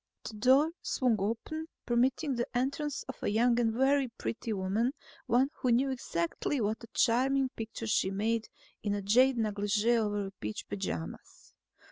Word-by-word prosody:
The -, -, -7 dB
door 260 Hz, +8 st, +4 dB
swung 245 Hz, -4 st, +1 dB
open, 230 Hz, +10 st, -3 dB, 0.2 s
permitting 260 Hz, +4 st, +1 dB
the 240 Hz, -1 st, -1 dB
entrance 280 Hz, +3 st, -1 dB
of 265 Hz, -, -9 dB
a -, -, -1 dB
young 235 Hz, +3 st, +3 dB
and 230 Hz, -2 st, +2 dB
very 265 Hz, +3 st, +2 dB
pretty 230 Hz, -1 st, -5 dB
woman, 210 Hz, +6 st, 0 dB, 0.3 s
one 255 Hz, +4 st, +3 dB
who 250 Hz, -, +1 dB
knew 265 Hz, +3 st, +3 dB
exactly 240 Hz, -, -2 dB
what 215 Hz, +1 st, -1 dB
a -, -, -9 dB
charming 265 Hz, +3 st, +3 dB
picture 225 Hz, -1 st, -6 dB
she 215 Hz, -3 st, +2 dB
made 220 Hz, +3 st, -1 dB, 0.3 s
in 205 Hz, -1 st, -1 dB
jade 250 Hz, +5 st, +5 dB
negligee 210 Hz, +1 st, +1 dB
over 205 Hz, -3 st, -1 dB
peach 105 Hz, 0 st, -5 dB
pajamas. 190 Hz, -, -6 dB
230 Hz, 150 wpm, -31 LUFS, 210-260 Hz, 0.3 s, jade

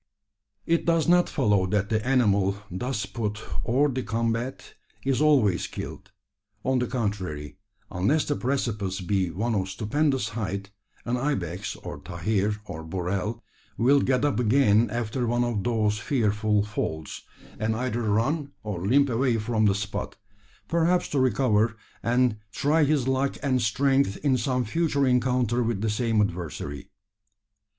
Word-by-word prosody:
It 170 Hz, 0 st, +2 dB
does 165 Hz, -1 st, +2 dB
not 175 Hz, 0 st, +4 dB
follow 105 Hz, -, +2 dB
that 100 Hz, +1 st, 0 dB
the 110 Hz, -1 st, 0 dB
animal 100 Hz, -6 st, +2 dB
thus 110 Hz, +3 st, -2 dB
put 105 Hz, +1 st, -3 dB, 0.3 s
hors 135 Hz, +4 st, +2 dB
de 130 Hz, -, -1 dB
combat 115 Hz, +2 st, -2 dB, 0.3 s
is 135 Hz, 0 st, +1 dB
always 125 Hz, -, +3 dB
killed. -, -, -8 dB, 0.5 s
On 130 Hz, -1 st, +2 dB
the 125 Hz, -, 0 dB
contrary, 95 Hz, -, -3 dB, 0.3 s
unless 115 Hz, -, +1 dB
the 145 Hz, -, 0 dB
precipice 110 Hz, -8 st, -1 dB
be 95 Hz, 0 st, 0 dB
one 110 Hz, +8 st, -1 dB
of 95 Hz, -3 st, -1 dB
stupendous 125 Hz, +4 st, 0 dB
height, 100 Hz, -3 st, -4 dB, 0.3 s
an 120 Hz, +1 st, 0 dB
ibex, 95 Hz, -, -2 dB
or -, -, -8 dB
tahir, 100 Hz, +5 st, -1 dB
or 80 Hz, -5 st, -7 dB
burrell, 95 Hz, +6 st, -3 dB, 0.3 s
will 135 Hz, +5 st, +5 dB
get 130 Hz, +2 st, +2 dB
up 145 Hz, -4 st, +1 dB
again 115 Hz, -2 st, +4 dB
after 120 Hz, +2 st, -2 dB
one 120 Hz, +1 st, +1 dB
of 115 Hz, -5 st, -1 dB
those 110 Hz, -3 st, +1 dB
fearful 105 Hz, -4 st, +1 dB
falls; 80 Hz, -7 st, -4 dB, 0.4 s
and 110 Hz, +1 st, 0 dB
either 120 Hz, 0 st, -2 dB
run 135 Hz, +8 st, 0 dB
or 100 Hz, -5 st, -4 dB
limp 140 Hz, +8 st, +4 dB
away 125 Hz, -1 st, +1 dB
from 110 Hz, 0 st, +1 dB
the 100 Hz, -2 st, +3 dB
spot 100 Hz, 0 st, -4 dB, 0.5 s
perhaps 170 Hz, +2 st, +2 dB
to 140 Hz, -, 0 dB
recover, 115 Hz, -3 st, +2 dB, 0.2 s
and 120 Hz, -1 st, +2 dB
try 150 Hz, +8 st, +2 dB
his 140 Hz, -3 st, +1 dB
luck 135 Hz, +1 st, 0 dB
and 130 Hz, -3 st, +2 dB
strength 135 Hz, 0 st, +2 dB
in 135 Hz, -2 st, +4 dB
some 125 Hz, 0 st, 0 dB
future 145 Hz, +2 st, +1 dB
encounter 125 Hz, -1 st, +2 dB
with 115 Hz, -4 st, -1 dB
the 110 Hz, -1 st, 0 dB
same 115 Hz, 0 st, +1 dB
adversary. 85 Hz, -7 st, -4 dB
115 Hz, 145 wpm, -26 LUFS, 100-130 Hz, 0.5 s, will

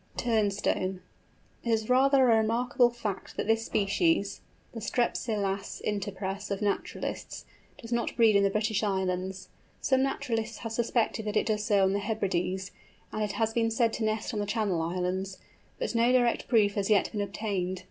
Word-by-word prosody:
TURNSTONE. 205 Hz, -4 st, 0 dB, 0.6 s
It 235 Hz, -, -3 dB
is 220 Hz, -1 st, +1 dB
rather 265 Hz, +2 st, +5 dB
a 225 Hz, -, +6 dB
remarkable 240 Hz, +3 st, +2 dB
fact 220 Hz, -5 st, -5 dB
that -, -, -1 dB
this 225 Hz, +1 st, +2 dB
species, 200 Hz, -, +1 dB, 0.3 s
the 230 Hz, -, -7 dB
Strepsilas 205 Hz, -4 st, -1 dB
interpres 200 Hz, -1 st, -3 dB
of 200 Hz, -1 st, -2 dB
naturalists, 205 Hz, -1 st, -3 dB, 0.3 s
does 230 Hz, -, -10 dB
not 235 Hz, 0 st, -1 dB
breed 225 Hz, -3 st, +5 dB
in 200 Hz, -, +5 dB
the 200 Hz, -, +3 dB
British 215 Hz, +1 st, 0 dB
Islands. 190 Hz, -2 st, -2 dB, 0.3 s
Some 265 Hz, -1 st, +2 dB
naturalists 230 Hz, -4 st, -2 dB
have 225 Hz, -, -3 dB
suspected 225 Hz, -1 st, 0 dB
that 210 Hz, 0 st, -1 dB
it -, -, +2 dB
does 215 Hz, -2 st, 0 dB
so 205 Hz, -3 st, +3 dB
on 190 Hz, 0 st, +3 dB
the 200 Hz, -, +1 dB
Hebrides, 190 Hz, -3 st, -2 dB, 0.4 s
and 215 Hz, -, -3 dB
it 210 Hz, -1 st, -1 dB
has 225 Hz, -1 st, 0 dB
been 230 Hz, -1 st, +2 dB
said 225 Hz, 0 st, +1 dB
to 230 Hz, -, -2 dB
nest 215 Hz, +2 st, -1 dB
on 215 Hz, -, -2 dB
the 205 Hz, -, -2 dB
Channel 205 Hz, -6 st, 0 dB
Islands, 185 Hz, +3 st, -2 dB, 0.4 s
but -, -, -2 dB
no 235 Hz, +1 st, +3 dB
direct 245 Hz, -2 st, +2 dB
proof 210 Hz, -4 st, +3 dB
has 200 Hz, 0 st, -1 dB
yet 210 Hz, -2 st, +3 dB
been 210 Hz, -, -2 dB
obtained. 195 Hz, -3 st, -2 dB
215 Hz, 175 wpm, -29 LUFS, 195-230 Hz, 0.6 s, a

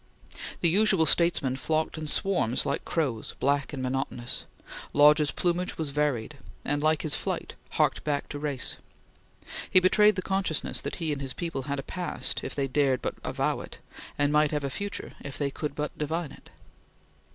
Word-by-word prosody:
The 170 Hz, -, +6 dB
usual 190 Hz, -2 st, +4 dB
statesmen 155 Hz, -5 st, +2 dB
flocked 155 Hz, +3 st, 0 dB
in 155 Hz, -1 st, -5 dB
swarms 150 Hz, -, +1 dB
like 140 Hz, -, -1 dB
crows, 135 Hz, -10 st, -2 dB
black 140 Hz, 0 st, +1 dB
and 135 Hz, -3 st, -4 dB
monotonous. 125 Hz, -2 st, -2 dB, 0.5 s
Lodge's 150 Hz, 0 st, +6 dB
plumage 180 Hz, +3 st, -1 dB
was 160 Hz, -3 st, -2 dB
varied, 140 Hz, -2 st, -1 dB, 0.3 s
and, 145 Hz, +1 st, 0 dB
like 155 Hz, 0 st, +2 dB
his 155 Hz, -, +1 dB
flight, -, -, -2 dB, 0.2 s
harked -, -, +2 dB
back 145 Hz, -2 st, -1 dB
to 145 Hz, -, -5 dB
race. 145 Hz, -4 st, -3 dB, 0.9 s
He 185 Hz, -, +8 dB
betrayed 210 Hz, +3 st, +5 dB
the 185 Hz, -, -2 dB
consciousness 190 Hz, -5 st, 0 dB
that -, -, -4 dB
he 165 Hz, -3 st, -2 dB
and 140 Hz, -, -5 dB
his 135 Hz, -2 st, -3 dB
people 165 Hz, -4 st, -3 dB
had 140 Hz, -, -1 dB
a 135 Hz, -, -4 dB
past, 180 Hz, -1 st, -1 dB
if -, -, -5 dB
they 140 Hz, -1 st, 0 dB
dared 135 Hz, -1 st, +2 dB
but -, -, -1 dB
avow -, -, 0 dB
it, -, -, -9 dB, 0.4 s
and 145 Hz, 0 st, +2 dB
might 150 Hz, 0 st, +4 dB
have 150 Hz, -1 st, -2 dB
a 140 Hz, -, -2 dB
future, 200 Hz, +7 st, -4 dB
if 140 Hz, -, -6 dB
they 140 Hz, -1 st, -1 dB
could 150 Hz, 0 st, -4 dB
but 150 Hz, 0 st, -3 dB
divine 160 Hz, +1 st, -2 dB
it. -, -, -15 dB
150 Hz, 180 wpm, -28 LUFS, 140-165 Hz, 0.9 s, He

